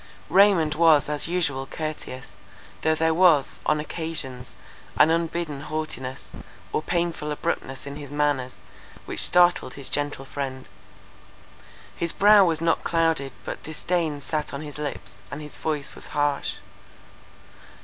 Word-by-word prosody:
Raymond 185 -5 +5
was 155 -3 +5
as 150 +1 -2
usual 150 -7 -1
courteous, 155 -5 -6 0.5
though 160 0 +2
there 160 +1 +2
was, 165 -5 +4
on 150 0 +3
occasions, 150 -6 -5 0.4
an 160 - +6
unbidden 165 -3 -1
haughtiness, 150 -4 -4 0.4
or - - +1
painful 170 -2 -1
abruptness 145 -4 -3
in 140 0 -6
his 145 -2 -8
manners, 145 -3 0 0.5
which - - -4
startled 175 -7 +4
his 140 -2 -8
gentle 145 -2 -2
friend; 130 -1 -5 1.3
his 170 -1 -1
brow 205 0 +7
was 165 -3 +1
not 165 0 +1
clouded 165 -5 +1
but - - -5
disdain 155 -1 -2
sat 150 -1 -3
on 140 - -5
his 150 -1 -7
lips, 145 -2 -5
and 140 - -6
his 150 -1 -8
voice 150 -2 -3
was - - -10
harsh. 145 -1 0
150 Hz, 135 wpm, -25 LUFS, 140-165 Hz, 1.3 s, brow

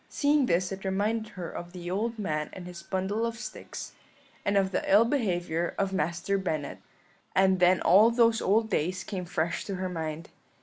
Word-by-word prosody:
Seeing 290 -2 +2
this 180 +2 +1
it 195 0 -6
reminded 210 +3 -1
her 180 -3 -6
of 175 +1 -8
the 175 -1 -6
old 225 +5 -1
man 155 -7 -2
and 185 - -8
his 180 -1 -8
bundle 190 +5 -2
of 230 0 -2
sticks, - - -7 0.5
and 200 0 +1
of 190 -1 +2
the - - -1
ill 210 +4 +7
behaviour 175 - -1
of 195 -1 0
Master 175 +4 0
Bennet; 155 -6 -3 0.6
and 190 -1 +4
then 180 +1 +4
all 210 +5 +6
those 230 -1 +3
old 220 +3 +2
days 185 +2 0
came 185 -3 -5
fresh 165 0 -1
to 195 - -3
her 185 0 -3
mind. 160 -2 -5
190 Hz, 185 wpm, -28 LUFS, 175-210 Hz, 0.6 s, ill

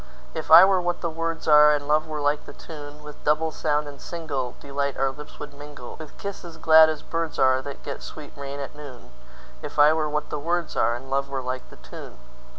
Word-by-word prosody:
If - - -5
I 165 +4 +11
were 190 -1 +3
what 175 0 -2
the 170 - -2
words 165 0 -4
are, 150 -1 +8
And 145 -1 -5
love 155 +1 +2
were 155 -1 -4
like 145 +1 0
the - - -9
tune, 150 -2 -10
With 150 0 -12
double 155 +2 +1
sound 150 -1 -1
and 145 -1 -10
singleDelight 140 -3 -4
our 135 0 +1
lips 150 +2 -12
would 145 -1 -8
mingle, 145 -3 -10
With 155 -2 -11
kisses 175 -5 -7
glad 160 0 +7
as 155 -1 -4
birds 165 -1 -3
areThat 130 +1 +1
get 140 - -6
sweet 150 -2 -10
rain 140 0 -6
at 140 - -6
noon; 140 -5 -11 0.5
If - - -8
I 150 +1 +7
were 155 -1 0
what 150 0 -3
the 150 - -2
words 170 +2 -1
areAnd 120 +3 -1
love 140 0 0
were 135 -1 -3
like 130 0 -5
the - - -14
tune. - - -11
150 Hz, 215 wpm, -24 LUFS, 140-160 Hz, 0.5 s, I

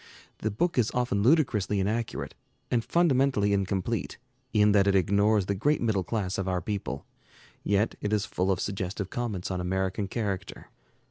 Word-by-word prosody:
The 110 - -1
book 130 - 0
is 115 - +2
often 125 -5 +1
ludicrously 110 - +2
inaccurate, 110 +4 -2 0.4
and 120 -2 +2
fundamentally 135 -11 +2
incomplete 100 +3 -1 0.3
in 105 -2 +4
that 100 -1 +4
it 100 - +3
ignores 100 +2 +3
the 100 - 0
great 145 +10 +1
middle 110 -5 +1
class 95 -2 -2
of 95 - -2
our 90 -1 0
people, 85 -8 -4 0.6
yet 100 +2 +1
it 105 - -2
is 105 -1 +1
full 95 +2 0
of 95 - 0
suggestive 95 0 -3
comments 105 -7 -3
on 90 -1 -2
American 95 +2 -1
character. 100 -3 -4
100 Hz, 160 wpm, -28 LUFS, 95-115 Hz, 0.6 s, in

